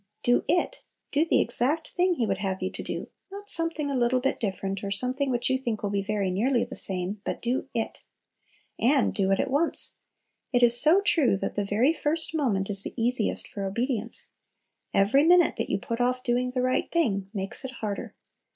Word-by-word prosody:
"Do 245 0 +2
it!" 355 +9 0 0.3
Do 300 +3 +2
the - - +2
exact 270 +7 0
thing 360 0 +1
He 240 - 0
would 195 -2 -2
have 190 -1 -3
you 185 - -2
do, - - -6 0.2
not 405 +1 -3
something 330 -3 -1
a - - -2
little 250 0 +1
bit 270 +2 -2
different, 195 -2 -4
or 200 - -3
something 255 +7 -1
which 240 -1 0
you 260 0 +1
think 235 -5 -4
will 200 - -2
be 200 -1 0
very 200 -2 -2
nearly 235 +6 +1
the 255 - -9
same, 190 +2 +2
but - - -4
do 250 +3 -3
"it." 225 - -4 0.8
And 265 +1 +2
"do 195 -2 0
it" 195 - +1
at - - -1
once. 305 +5 +3 0.5
It 245 -2 +2
is 240 0 +9
so 340 +6 +5
true, 305 - +2
that - - -4
"the 205 - -2
very 225 +10 +2
first 315 +1 0
moment 225 -11 0
is 195 -1 +3
the - - -6
easiest 235 -1 0
for 200 - -7
obedience." 230 +3 -2 0.6
Every 215 +9 +3
minute 350 +2 +4
that - - -3
you - - 0
put 230 -1 -4
off 250 +1 0
doing 250 0 0
the 250 0 -2
right 255 0 0
thing 200 - 0
makes 195 +3 -4
it 265 - -5
harder. 215 -5 -6
245 Hz, 205 wpm, -26 LUFS, 205-280 Hz, 0.8 s, is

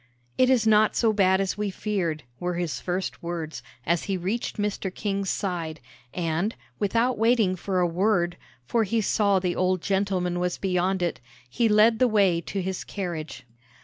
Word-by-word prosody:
"It 255 - +4
is 250 -4 +3
not 215 -1 +4
so 225 -2 +3
bad 190 -2 +3
as 195 +1 -1
we 210 -1 0
feared," 185 -6 -2 0.2
were 180 0 -2
his 170 -3 -2
first 185 +1 -3
words, 170 -2 -5 0.2
as 170 0 +1
he 195 -2 -1
reached 195 +7 -3
Mr. 205 -2 -2
King's 195 0 -2
side; 165 -5 -3 0.3
and, 175 +5 -1 0.2
without 230 +4 +1
waiting 225 -5 +3
for 185 +1 -2
a 180 - +3
word, 175 0 +1 0.3
for 230 - +1
he 225 +3 0
saw 200 -2 +2
the 180 -2 -1
old 185 -1 +1
gentleman 190 -3 0
was 180 0 -1
beyond 185 0 0
it, 175 - -1 0.3
he 225 - +1
led 215 +2 +5
the 255 - +5
way 195 -6 +3
to 190 +3 -4
his 190 0 -3
carriage. 160 - -5
190 Hz, 175 wpm, -26 LUFS, 175-210 Hz, 0.3 s, led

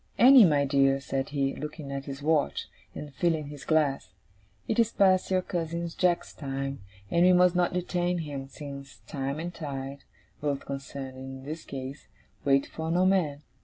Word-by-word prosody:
'Annie, 255 -2 +9
my 145 -4 +3
dear,' 135 -1 +3
said 135 0 -3
he, 140 -2 0
looking 150 -2 -6
at 140 0 -4
his 140 0 -7
watch, 155 -1 +1 0.3
and 145 -2 -7
filling 155 +1 0
his 145 -2 -9
glass, 140 - +1 0.5
'it 225 - 0
is 230 -1 +4
past 190 -3 +3
your 185 -1 +2
cousin 170 -1 -3
Jack's 180 -2 +1
time, 135 -3 -4 0.3
and 170 0 +4
we 180 - +7
must 180 0 +5
not 175 -1 +2
detain 180 0 -1
him, 145 -4 -5
since 140 -1 -9
time 140 +1 -3
and 175 +2 -4
tide 140 -3 -5 0.4
both 145 -2 -2
concerned 135 -1 -6
in 130 0 -8
this 155 +4 -6
case 135 +1 -7 0.4
wait 140 0 +3
for 160 0 -5
no 180 +2 +3
man. 160 -7 +1
145 Hz, 170 wpm, -28 LUFS, 135-175 Hz, 0.5 s, Annie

